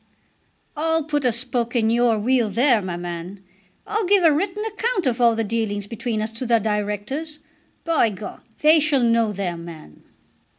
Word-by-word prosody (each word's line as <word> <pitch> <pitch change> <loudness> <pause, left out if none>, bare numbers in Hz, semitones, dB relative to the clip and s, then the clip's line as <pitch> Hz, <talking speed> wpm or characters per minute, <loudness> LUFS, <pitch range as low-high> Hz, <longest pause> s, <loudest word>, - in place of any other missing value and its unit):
"I'll 320 +1 0
put 295 -2 -2
a 250 - +4
spoke 235 0 -2
in 225 -2 +2
your 235 -1 +3
wheel 235 +1 +1
there, 235 +2 +3
my 180 -2 -4
man. 175 +2 -7 0.4
I'll 425 -2 -1
give 400 -1 +4
a 325 - +6
written 385 +7 -1
account 445 -2 -2
of 250 -1 0
all 235 -1 +5
the 225 - 0
dealings 210 -2 -2
between 225 0 -3
us 215 - -4
to 230 +3 -6
the 235 -1 +4
Directors. 215 +9 -3 0.5
By 325 -8 +2
G, 205 0 -8 0.4
they 310 +1 +6
shall 290 -4 +2
know 230 -2 +2
their 185 -4 -3
man." 165 - -11
235 Hz, 175 wpm, -22 LUFS, 210-300 Hz, 0.5 s, a